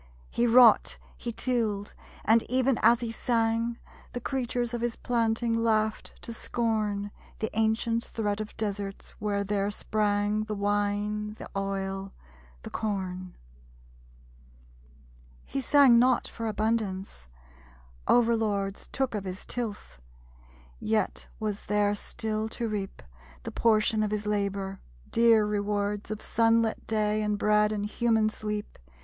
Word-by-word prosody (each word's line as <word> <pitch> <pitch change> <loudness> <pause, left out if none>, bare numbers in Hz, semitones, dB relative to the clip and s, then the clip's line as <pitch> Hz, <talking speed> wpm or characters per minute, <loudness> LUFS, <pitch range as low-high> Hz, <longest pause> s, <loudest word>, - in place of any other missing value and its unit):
He 240 - +2
wrought, 235 -1 +6 0.2
he 235 - -4
tilled; 220 -4 -1 0.3
and 225 +1 +5
even 255 0 +2
as 235 +2 +5
he 235 -1 -2
sang, 230 0 0 0.4
The 245 - -3
creatures 245 -2 -2
of 240 - -2
his 240 -1 -1
planting 230 -1 0
laughed 220 -1 0
to 230 - -5
scorn 215 -3 -1 0.3
The 220 - -2
ancient 225 +1 +1
threat 210 -1 -2
of 215 - -8
deserts 200 -2 -4
where 205 -1 0
there 200 0 0
sprang 210 0 0
The 215 -1 -3
wine, 205 +1 -1
the - - -8
oil, 195 0 -3 0.5
the - - -8
corn! 185 -4 -3 2.1
He 275 - -3
sang 265 -2 +6
not 250 0 +3
for 230 -1 -5
abundance. 205 - -2 0.8
Over 235 -1 +5
lords 200 -3 -2
Took 265 -3 -1
of 205 -2 -3
his 185 +1 -6
tilth. 220 - -5 0.8
Yet 220 -1 -1
was 210 -2 -3
there 205 0 +2
still 215 +1 -3
to 235 - -1
reap, 205 -3 -4 0.4
The - - -5
portion 215 -1 +2
of 215 - +1
his 210 0 -2
labor; 200 -2 -1 0.3
dear 230 -2 +5
rewards 205 0 -1
Of 215 -1 -5
sunlit 230 -1 +2
day, 215 -1 +1
and 210 -1 0
bread, 210 0 +3
and 205 -1 -2
human 220 0 +2
sleep. 210 -1 -5
215 Hz, 130 wpm, -28 LUFS, 205-230 Hz, 2.1 s, wrought